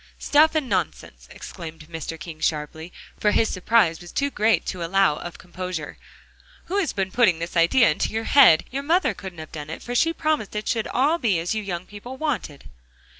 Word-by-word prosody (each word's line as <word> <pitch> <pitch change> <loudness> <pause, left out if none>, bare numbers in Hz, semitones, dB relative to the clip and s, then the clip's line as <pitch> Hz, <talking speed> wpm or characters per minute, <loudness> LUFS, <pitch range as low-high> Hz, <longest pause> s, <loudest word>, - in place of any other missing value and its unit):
"Stuff 310 +2 +3
and 305 -4 0
nonsense!" 75 - -3
exclaimed 165 -1 -9
Mr. 165 0 -6
King 155 0 -9
sharply, 160 +2 -3 0.3
for 210 - +3
his 220 +1 +2
surprise 185 -3 +2
was 175 - -11
too 280 0 -1
great 220 -1 +2
to 180 -3 -4
allow 185 -3 +2
of 175 - -8
composure, 180 -3 -6 0.7
"who 390 +4 -1
has 370 - 0
been 190 -1 -2
putting 220 -7 +3
this 170 +2 -6
idea 170 +6 +5
into - - -2
your 225 +1 -2
head? 245 - +6
Your 275 +2 -2
mother 325 - +2
couldn't 190 -2 -9
have 155 -1 -9
done 150 -1 -7
it, 160 - -7
for 245 - -5
she 330 +7 +3
promised 310 -11 -1
it 210 - -3
should 225 -3 0
all 295 +7 +1
be 215 - +1
as 170 +5 -2
you 215 - -2
young 180 -3 -5
people 225 +7 -10
wanted." 260 - -3
195 Hz, 200 wpm, -23 LUFS, 165-250 Hz, 0.7 s, head